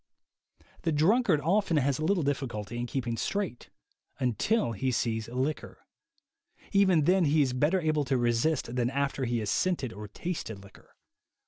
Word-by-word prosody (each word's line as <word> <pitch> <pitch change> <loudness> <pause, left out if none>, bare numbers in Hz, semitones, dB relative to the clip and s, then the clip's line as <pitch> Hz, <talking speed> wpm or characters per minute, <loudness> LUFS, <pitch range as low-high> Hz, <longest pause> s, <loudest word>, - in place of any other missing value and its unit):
The 165 - 0
drunkard 175 - +3
often 175 +1 +2
has 140 -1 +1
little 170 +2 +1
difficulty 120 -5 -3
in 120 - -3
keep 130 0 -3
ing 115 -1 -2
straight 195 - -3 0.5
until 130 - +1
he 130 +5 -1
sees 115 -2 -1
liquor; 130 +5 -3 0.9
even 190 -6 +4
then 180 +3 +3
he 150 +1 +4
is 130 -2 -1
better 150 +9 +2
able 155 -3 0
to 130 0 +1
resist 120 +2 0
than 120 -1 +1
after 140 0 -1
he 120 0 0
has 105 -1 -2
scented 165 -11 0
or 105 +1 -8
tasted 115 - -5
liquor. 100 - -18
140 Hz, 155 wpm, -29 LUFS, 120-165 Hz, 0.9 s, even